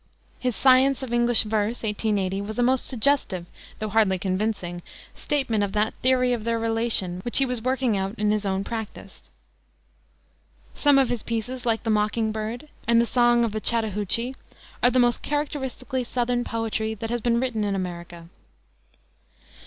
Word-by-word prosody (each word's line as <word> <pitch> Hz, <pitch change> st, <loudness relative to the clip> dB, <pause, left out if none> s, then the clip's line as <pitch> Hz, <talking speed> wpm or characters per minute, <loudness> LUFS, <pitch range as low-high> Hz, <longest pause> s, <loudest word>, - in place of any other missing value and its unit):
His 250 Hz, -3 st, -1 dB
Science 265 Hz, +1 st, +4 dB
of 245 Hz, -2 st, -5 dB
English 240 Hz, -1 st, +4 dB
Verse, 220 Hz, +2 st, -1 dB
1880, 205 Hz, -3 st, -1 dB
was 210 Hz, +1 st, -6 dB
a 245 Hz, -, +2 dB
most 255 Hz, +1 st, +2 dB
suggestive, 245 Hz, -8 st, +1 dB, 0.3 s
though 215 Hz, 0 st, -4 dB
hardly 210 Hz, -3 st, +3 dB
convincing, 185 Hz, -2 st, -2 dB, 0.3 s
statement 240 Hz, -8 st, 0 dB
of 200 Hz, -1 st, -3 dB
that 215 Hz, +1 st, +1 dB
theory 255 Hz, -1 st, +3 dB
of 230 Hz, -3 st, -3 dB
their 230 Hz, 0 st, 0 dB
relation 225 Hz, -5 st, 0 dB
which 240 Hz, -, +3 dB
he 275 Hz, -, +4 dB
was 250 Hz, -3 st, -3 dB
working 255 Hz, -2 st, 0 dB
out 195 Hz, +2 st, -2 dB
in 210 Hz, 0 st, +1 dB
his 210 Hz, -1 st, 0 dB, 0.2 s
practice. 220 Hz, -2 st, -7 dB, 1.4 s
Some 290 Hz, -2 st, +4 dB
of 270 Hz, -2 st, +3 dB
his 240 Hz, -3 st, -2 dB
pieces, 240 Hz, +2 st, -4 dB
like 225 Hz, -1 st, +1 dB
the 225 Hz, -, 0 dB
Mocking 215 Hz, +1 st, +1 dB
Bird 220 Hz, +6 st, -5 dB, 0.2 s
and 235 Hz, 0 st, +5 dB
the 235 Hz, -, +3 dB
Song 240 Hz, 0 st, +3 dB
of 230 Hz, -, 0 dB
the 215 Hz, +1 st, -4 dB
Chattahoochie, 225 Hz, +2 st, 0 dB, 0.5 s
are 245 Hz, -, +5 dB
the 255 Hz, -, 0 dB
most 245 Hz, -1 st, +3 dB
characteristically 265 Hz, -3 st, -3 dB
Southern 245 Hz, 0 st, -1 dB
poetry 220 Hz, -1 st, -2 dB
that 225 Hz, +2 st, -5 dB
has 240 Hz, -1 st, -1 dB
been 235 Hz, 0 st, +2 dB
written 240 Hz, -4 st, -1 dB
in 200 Hz, -1 st, -1 dB
America. 175 Hz, -2 st, -6 dB
230 Hz, 165 wpm, -24 LUFS, 210-245 Hz, 1.4 s, and